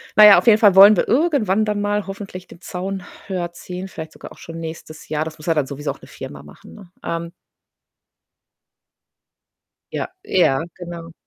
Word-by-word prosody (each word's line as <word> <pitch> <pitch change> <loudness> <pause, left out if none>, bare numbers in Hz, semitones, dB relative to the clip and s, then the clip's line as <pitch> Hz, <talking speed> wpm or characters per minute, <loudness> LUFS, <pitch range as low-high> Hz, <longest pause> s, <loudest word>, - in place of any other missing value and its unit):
Na 215 - +9
ja, 210 - +10
auf - - -7
jeden 215 -2 +7
Fall 205 -4 +5
wollen 200 +2 +9
wir - - +1
irgendwann 235 - +2
dann 210 -1 -1
mal 205 -1 -1
hoffentlich 195 -2 -8
den 170 - -15
Zaun 190 +1 -5 0.2
höher 175 -3 -3
ziehen, 180 +2 -7
vielleicht 160 -4 -8
sogar - - -11
auch - - -15
schon 165 0 -9
nächstes 160 -1 -8
Jahr. 155 0 -1
Das 160 0 -8
muss 155 - -12
ja 165 - +2
dann 145 -4 0
sowieso 145 +1 -4
auch - - -12
'ne - - -14
Firma 70 -1 -9
machen, 75 +1 -15
ne? 195 -5 -14
Ähm 170 0 -4 2.6
Ja, - - -2 0.2
ja, 160 -5 +2
genau. 170 -2 -8
180 Hz, 185 wpm, -20 LUFS, 160-205 Hz, 2.6 s, ja